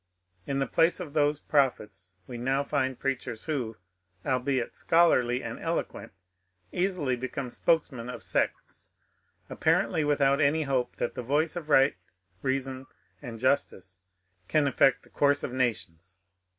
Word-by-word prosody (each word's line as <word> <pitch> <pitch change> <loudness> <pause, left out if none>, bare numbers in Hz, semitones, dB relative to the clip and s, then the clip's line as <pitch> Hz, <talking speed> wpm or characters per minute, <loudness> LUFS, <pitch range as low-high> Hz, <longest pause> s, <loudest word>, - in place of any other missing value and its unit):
In 135 - -1
the 135 - +1
place 165 +8 +2
of 165 -6 -7
those 150 -1 +2
prophets 105 - -1
we 125 - -8
now 135 +4 0
find 130 -3 -1
preachers 125 -4 -3
who, 125 -8 -3 0.5
albeit 130 -1 -1
scholarly 130 -8 +3
and - - -6
eloquent, - - -3 0.6
easily 175 -8 0
become 125 +1 -5
spokesmen 135 -8 0
of 125 - -7
sects, - - -2 0.6
apparently 160 - +1
without 140 -1 +2
any 155 +2 +3
hope 130 -3 -1
that - - -2
the - - -5
voice 145 +7 0
of 160 -3 -6
right 135 -1 +5 0.5
reason 130 0 -2 0.3
and 120 -5 -7
justice 100 -8 -1 0.5
can 150 +7 +2
affect 135 -1 +3
the - - -20
course 145 0 +2
of 125 - -4
nations. 95 -8 -3
135 Hz, 135 wpm, -28 LUFS, 125-145 Hz, 0.6 s, right